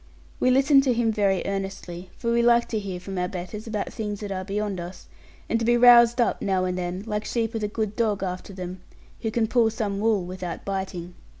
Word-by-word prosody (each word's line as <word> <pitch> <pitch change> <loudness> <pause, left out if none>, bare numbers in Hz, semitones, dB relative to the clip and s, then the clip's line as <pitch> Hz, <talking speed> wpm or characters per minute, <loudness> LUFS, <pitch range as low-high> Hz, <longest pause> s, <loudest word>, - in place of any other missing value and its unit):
We 255 - +3
listened 275 +2 +5
to 250 -3 +2
him 230 -1 +2
very 200 -3 +1
earnestly, 195 -2 -5
for 235 -2 -1
we 235 0 +3
like 235 0 +4
to 220 - -1
hear 190 -3 -5
from 190 +1 -5
our 180 - 0
betters 185 +5 -6
about 215 -2 -3
things 210 -2 -4
that 205 -1 -5
are 185 -1 -3
beyond 200 0 -2
us, 175 +2 -8 0.4
and 230 - +1
to - - -2
be 240 +1 +4
roused 240 0 +7
up 240 - +1
now 190 -2 +1
and 180 0 -1
then, 180 +1 -3
like 210 -1 -2
sheep 230 0 -1
with 225 -1 -3
a - - +1
good 215 0 -3
dog 215 -4 0
after 185 +1 -4
them, 185 -1 -7 0.4
who 225 - -1
can 225 0 +1
pull 230 0 +3
some 210 -3 -3
wool 210 -4 +1
without 180 -1 -6
biting. 190 -3 -4
205 Hz, 225 wpm, -25 LUFS, 185-230 Hz, 0.4 s, roused